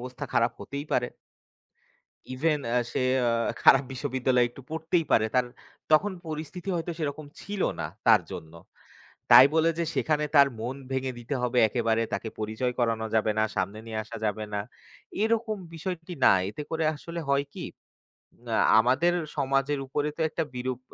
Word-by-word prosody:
অবস্থা 125 Hz, 0 st, -6 dB
খারাপ 115 Hz, 0 st, +3 dB
হতেই 140 Hz, +1 st, -5 dB
পারে। 125 Hz, -1 st, +2 dB, 1.3 s
ইভেন 150 Hz, +3 st, +1 dB
অ্যা 125 Hz, +1 st, +2 dB
সে -, -, -1 dB, 0.3 s
আ -, -, +3 dB, 0.3 s
খারাপ 135 Hz, +1 st, +7 dB
বিশ্ববিদ্যালয়ে 130 Hz, -2 st, +1 dB
একটু 130 Hz, +2 st, -13 dB
পড়তেই 160 Hz, +1 st, 0 dB
পারে। 110 Hz, -, +4 dB
তার 125 Hz, -1 st, +3 dB, 0.5 s
তখন 190 Hz, +6 st, +4 dB
পরিস্থিতি 160 Hz, +4 st, -6 dB
হয়তো 170 Hz, +1 st, -2 dB
সেরকম 150 Hz, -1 st, -4 dB
ছিল 205 Hz, -2 st, -4 dB, 0.2 s
না, -, -, -2 dB, 0.2 s
তার -, -, +7 dB
জন্য। 80 Hz, 0 st, -8 dB, 0.8 s
তাই 130 Hz, -, +10 dB
বলে 160 Hz, +1 st, +4 dB
যে 170 Hz, -, +1 dB
সেখানে 150 Hz, -1 st, +1 dB
তার 140 Hz, 0 st, +8 dB
মন 125 Hz, +4 st, -4 dB, 0.2 s
ভেঙে 130 Hz, 0 st, -1 dB
দিতে 120 Hz, +4 st, -4 dB
হবে 125 Hz, 0 st, +1 dB
একেবারে, 115 Hz, -1 st, +1 dB
তাকে 110 Hz, -, -2 dB
পরিচয় 110 Hz, +4 st, -2 dB
করানো 115 Hz, -2 st, 0 dB
যাবে 110 Hz, -1 st, +2 dB
না, 110 Hz, -, +4 dB
সামনে 105 Hz, +2 st, -2 dB
নিয়ে 110 Hz, -1 st, -4 dB
আসা 115 Hz, +2 st, -8 dB
যাবে 110 Hz, 0 st, -1 dB
না, 100 Hz, -, 0 dB, 0.6 s
এরকম 220 Hz, -1 st, +1 dB, 0.2 s
বিষয়টি 175 Hz, +1 st, -5 dB
না। -, -, +8 dB, 0.2 s
এতে 110 Hz, +8 st, -6 dB
করে 160 Hz, -1 st, -1 dB
আসলে 170 Hz, +3 st, -7 dB
হয় 140 Hz, 0 st, +2 dB
কি, -, -, -6 dB, 0.9 s
আ -, -, +2 dB, 0.2 s
আমাদের 135 Hz, +9 st, +3 dB, 0.2 s
সমাজের 135 Hz, +1 st, +1 dB
উপরে 145 Hz, +2 st, -1 dB
তো -, -, -3 dB
একটা 165 Hz, -, -2 dB
বিরূপ 125 Hz, 0 st, -3 dB
135 Hz, 165 wpm, -27 LUFS, 120-160 Hz, 1.3 s, তাই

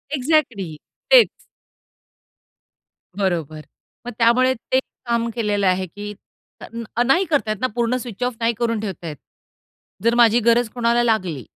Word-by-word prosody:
Exactly 250 Hz, -, 0 dB, 0.4 s
तेच. -, -, +8 dB, 1.9 s
बरोबर. 170 Hz, -6 st, -2 dB, 0.5 s
मग -, -, -3 dB
त्यामुळे 250 Hz, +2 st, +4 dB
ते 260 Hz, +1 st, -1 dB
काम 235 Hz, -2 st, -3 dB
केलेलं 205 Hz, -4 st, 0 dB
आहे, 185 Hz, 0 st, +1 dB
की 205 Hz, +4 st, -8 dB, 0.5 s
तर -, -, -8 dB, 0.3 s
अ, 240 Hz, -, +3 dB
नाही 330 Hz, +10 st, +3 dB
करता 285 Hz, -10 st, 0 dB
येत 215 Hz, -, -4 dB
ना, 255 Hz, -, +2 dB
पूर्ण 240 Hz, +1 st, +1 dB
स्विच 245 Hz, -2 st, -6 dB
ऑफ 250 Hz, -1 st, -1 dB
नाही 230 Hz, 0 st, +1 dB
करून 230 Hz, -2 st, 0 dB
ठेवता 195 Hz, -5 st, -6 dB
येत. 150 Hz, -2 st, -6 dB, 0.9 s
जर 230 Hz, +1 st, +3 dB
माझी 235 Hz, -1 st, +5 dB
गरज 235 Hz, 0 st, +2 dB
कोणाला 240 Hz, 0 st, +2 dB
लागली 185 Hz, -, -1 dB
230 Hz, 145 wpm, -21 LUFS, 200-245 Hz, 1.9 s, तेच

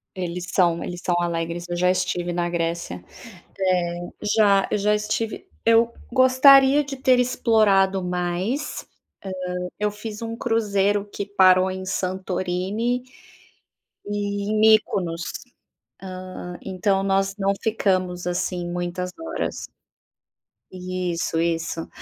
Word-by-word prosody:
Eles 180 Hz, -1 st, -4 dB
são, 170 Hz, -3 st, +2 dB
eles 175 Hz, 0 st, -6 dB
são 175 Hz, -, +1 dB
alegres, 170 Hz, 0 st, -2 dB
eu 175 Hz, -, -3 dB
já 180 Hz, +1 st, +3 dB
estive 180 Hz, -1 st, -1 dB
na 175 Hz, 0 st, 0 dB
Grécia. 165 Hz, -, -3 dB, 1.0 s
É, 175 Hz, -, -7 dB, 0.3 s
já, 200 Hz, -3 st, +4 dB
eu -, -, +1 dB
já 210 Hz, +1 st, +2 dB
estive, 210 Hz, +1 st, -2 dB, 0.2 s
eu 230 Hz, +1 st, +4 dB, 0.2 s
gostaria 265 Hz, +3 st, +6 dB
de 275 Hz, -1 st, -7 dB
ter 260 Hz, -1 st, +4 dB
explorado 205 Hz, -6 st, +3 dB
mais, 180 Hz, +10 st, -2 dB, 0.7 s
hã, 180 Hz, 0 st, -4 dB
eu 210 Hz, 0 st, 0 dB
fiz 210 Hz, +1 st, -8 dB
um 230 Hz, 0 st, -4 dB
cruzeiro 205 Hz, -4 st, +1 dB
que 200 Hz, -, -4 dB
parou 190 Hz, -2 st, +4 dB
em 190 Hz, 0 st, -5 dB
Santorini, 190 Hz, +5 st, -2 dB, 1.1 s
e 205 Hz, 0 st, -2 dB
Mikonos, 210 Hz, -6 st, +3 dB, 1.1 s
hã, 180 Hz, 0 st, -7 dB
então, 195 Hz, +1 st, 0 dB
nós 195 Hz, 0 st, +1 dB
não 195 Hz, 0 st, +2 dB
ficamos, 185 Hz, -5 st, 0 dB
assim, 175 Hz, 0 st, -2 dB
muitas 175 Hz, +1 st, -3 dB
horas 330 Hz, -, -4 dB, 1.0 s
isso, 180 Hz, -2 st, -2 dB
isso. 165 Hz, -1 st, -2 dB
190 Hz, 115 wpm, -23 LUFS, 175-215 Hz, 1.1 s, gostaria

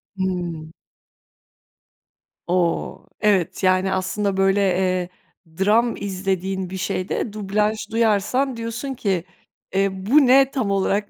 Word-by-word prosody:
Hıı. 175 Hz, -4 st, -3 dB, 1.8 s
O! 175 Hz, -1 st, -1 dB, 0.2 s
Evet, 200 Hz, -4 st, +1 dB
yani, 185 Hz, 0 st, +3 dB
aslında, 195 Hz, +1 st, -1 dB
böyle, 195 Hz, +1 st, +3 dB
eee, 185 Hz, -1 st, +1 dB, 0.5 s
dram 225 Hz, +5 st, +3 dB
izlediğin 190 Hz, -1 st, -3 dB
bir 190 Hz, -, -5 dB
şeyde 185 Hz, +3 st, -2 dB
dublaj 210 Hz, +1 st, 0 dB
duyarsan, 230 Hz, +4 st, +1 dB
diyorsun 230 Hz, +4 st, -4 dB
ki, 195 Hz, -8 st, -1 dB, 0.5 s
eee, 195 Hz, +1 st, +2 dB
bu 235 Hz, +10 st, +3 dB
ne 270 Hz, +1 st, +5 dB
tam 250 Hz, -8 st, -1 dB
olarak 200 Hz, +1 st, 0 dB
195 Hz, 110 wpm, -22 LUFS, 185-220 Hz, 1.8 s, ne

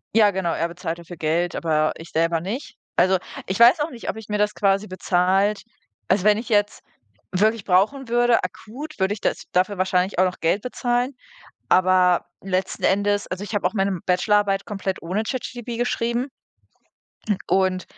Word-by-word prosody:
Ja 210 Hz, -2 st, +6 dB
genau, 185 Hz, -3 st, -1 dB
er 170 Hz, -, -1 dB
bezahlt 170 Hz, -1 st, -5 dB
dafür 170 Hz, 0 st, -10 dB
Geld, 165 Hz, +3 st, 0 dB
aber 155 Hz, -2 st, +1 dB
ich 165 Hz, -, -11 dB
selber 165 Hz, 0 st, +1 dB
nicht. 225 Hz, -, -5 dB, 0.2 s
Also, 185 Hz, +1 st, +4 dB, 0.3 s
ich 190 Hz, +4 st, -3 dB
weiß 245 Hz, +7 st, +7 dB
auch 305 Hz, +1 st, -1 dB
nicht, 235 Hz, -, -7 dB
ob -, -, -2 dB
ich 220 Hz, -1 st, -10 dB
mir 210 Hz, -, 0 dB
das 210 Hz, 0 st, +1 dB
quasi 195 Hz, +1 st, +1 dB
bezahlt 185 Hz, +3 st, +1 dB, 0.5 s
also 190 Hz, 0 st, +2 dB
wenn 210 Hz, 0 st, +5 dB
ich 225 Hz, -, -6 dB
jetzt 205 Hz, -2 st, +1 dB, 0.5 s
wirklich 215 Hz, +3 st, +1 dB
brauchen 215 Hz, +8 st, +2 dB
würde, 240 Hz, 0 st, +3 dB
akut, 290 Hz, +8 st, -7 dB
würde 190 Hz, +1 st, +1 dB
ich 210 Hz, -, -8 dB
das -, -, -1 dB
dafür 185 Hz, +1 st, +1 dB
wahrscheinlich 185 Hz, 0 st, 0 dB
auch -, -, +6 dB
noch 180 Hz, -1 st, -1 dB
Geld 175 Hz, +5 st, +1 dB
bezahlen, 245 Hz, +1 st, -1 dB, 0.6 s
aber 185 Hz, -1 st, +4 dB, 0.2 s
letzten 190 Hz, 0 st, -2 dB
Endes 205 Hz, +1 st, +2 dB
also 185 Hz, +2 st, -5 dB
ich 210 Hz, -, -6 dB
habe 200 Hz, -, +1 dB
auch 185 Hz, -, 0 dB
meine 195 Hz, -2 st, +1 dB
m 180 Hz, -3 st, -3 dB
Bachelorarbeit 195 Hz, +1 st, +2 dB
komplett 195 Hz, -2 st, -3 dB
ohne 185 Hz, +6 st, -1 dB
ChatGPT 240 Hz, -1 st, -5 dB
geschrieben 240 Hz, +1 st, -1 dB, 1.2 s
und 185 Hz, -1 st, +2 dB
195 Hz, 175 wpm, -23 LUFS, 185-220 Hz, 1.2 s, weiß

